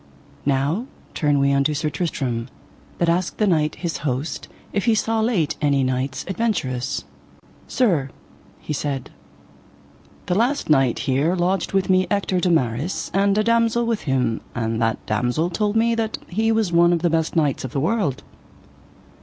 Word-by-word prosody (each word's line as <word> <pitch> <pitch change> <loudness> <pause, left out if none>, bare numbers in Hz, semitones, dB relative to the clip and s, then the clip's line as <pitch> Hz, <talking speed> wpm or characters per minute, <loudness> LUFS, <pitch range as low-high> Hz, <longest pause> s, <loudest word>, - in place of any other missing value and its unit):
Now 145 - +1 0.3
turn 145 -2 +1
we 140 0 +3
unto 140 +2 +2
Sir 150 +1 -1
Tristram, 135 -6 -2 0.5
that 170 - +1
asked 170 +1 0
the 215 - +2
knight 155 -6 +1
his 170 -3 -3
host 145 +2 -3 0.3
if 200 - 0
he 230 - +4
saw 225 +1 0
late 190 -10 +1
any 140 -2 +2
knights 130 +1 -2
adventurous. 170 - -1 0.6
Sir, 170 - +1 0.5
he - - -5
said, 140 -2 -3 1.1
the - - 0
last 235 - +1
night 135 -5 +3
here 140 +7 +2
lodged 180 +1 0
with 195 -1 +2
me 185 -1 +3
Ector 200 -3 0
de 180 - +1
Maris 140 +1 0
and 200 +1 +2
a 215 - +3
damosel 230 +1 +2
with 230 -2 -1
him, 125 -4 +1
and 115 -1 -1
that 115 0 +1
damosel 125 +10 0
told 205 +4 0
me 230 +1 +3
that 225 -1 -1
he 220 +5 +1
was 220 -5 +1
one 170 +1 +5
of 170 -1 -1
the 175 - +3
best 165 0 0
knights 150 -4 +1
of 130 - -5
the 140 - -1
world. 155 - 0
165 Hz, 165 wpm, -22 LUFS, 135-200 Hz, 1.1 s, one